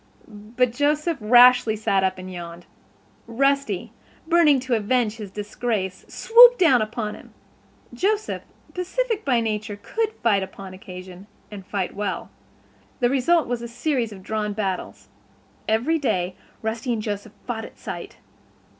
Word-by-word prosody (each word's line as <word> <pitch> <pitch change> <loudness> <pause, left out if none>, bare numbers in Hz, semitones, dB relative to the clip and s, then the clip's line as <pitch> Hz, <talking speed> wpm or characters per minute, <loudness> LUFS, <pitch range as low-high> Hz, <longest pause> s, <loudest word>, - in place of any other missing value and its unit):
But 230 +3 -2
Joseph 300 +4 0
rashly 240 0 +6
sat 200 -2 +1
up 190 0 0
and 185 0 -8
yawned. 170 0 -8 0.6
Rusty, 275 -4 0 0.3
burning 325 -5 +5
to 255 -1 -2
avenge 225 0 +1
his 210 -3 -7
disgrace, 205 -2 -3
swooped 485 +1 +7
down 270 -10 +5
upon 215 0 -3
him. - - -14 0.6
Joseph, 420 - -1 0.3
pacific 445 +5 -2
by 250 -4 +2
nature, 215 -1 -3
could 440 - -2
fight 210 -4 +3
upon 190 0 -8
occasion 185 0 -10 0.2
and 200 -2 -8
fight 190 -1 -3
well. 205 0 -4 0.7
The 245 0 +2
result 290 +4 +2
was 240 -1 -2
a 235 - -5
series 240 -1 -1
of 190 -2 -11
drawn 210 0 -2
battles. 195 -3 -4 0.6
Every 245 +10 +1
day 185 -9 -1 0.3
Rusty 225 +3 -2
and 220 - -2
Joseph 210 0 -5
fought 225 -2 -4
at - - -14
sight. - - -7
225 Hz, 140 wpm, -23 LUFS, 205-270 Hz, 0.7 s, swooped